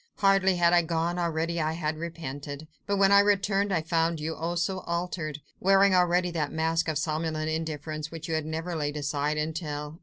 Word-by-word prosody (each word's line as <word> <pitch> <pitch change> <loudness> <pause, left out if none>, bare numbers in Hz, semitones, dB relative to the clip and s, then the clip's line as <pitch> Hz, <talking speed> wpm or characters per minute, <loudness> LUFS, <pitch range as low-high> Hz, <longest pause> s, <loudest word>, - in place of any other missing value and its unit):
"Hardly 195 -1 +4
had 170 0 +3
I 175 - +6
gone, 170 +1 -1
already 170 0 -1
I 155 +1 0
had 160 -1 -2
repented. 155 -3 -6 0.2
But 200 0 +1
when 195 0 +4
I 200 - +8
returned, 200 0 +2
I 165 -4 +1
found 165 0 +1
you, 160 +1 -3
oh, 170 +2 -3
so 185 +2 -1
altered! 170 -4 -3 0.2
wearing 195 +1 +5
already 180 0 +3
that 155 -4 -2
mask 165 +1 0
of 155 -2 0
somnolent 155 0 -1
indifference 155 -1 -4
which 165 -1 -7
you 165 - -2
have 155 -1 -1
never 165 +2 -3
laid 145 -1 -2
aside 145 +1 -1
until 150 0 -4
165 Hz, 190 wpm, -27 LUFS, 155-175 Hz, 0.2 s, I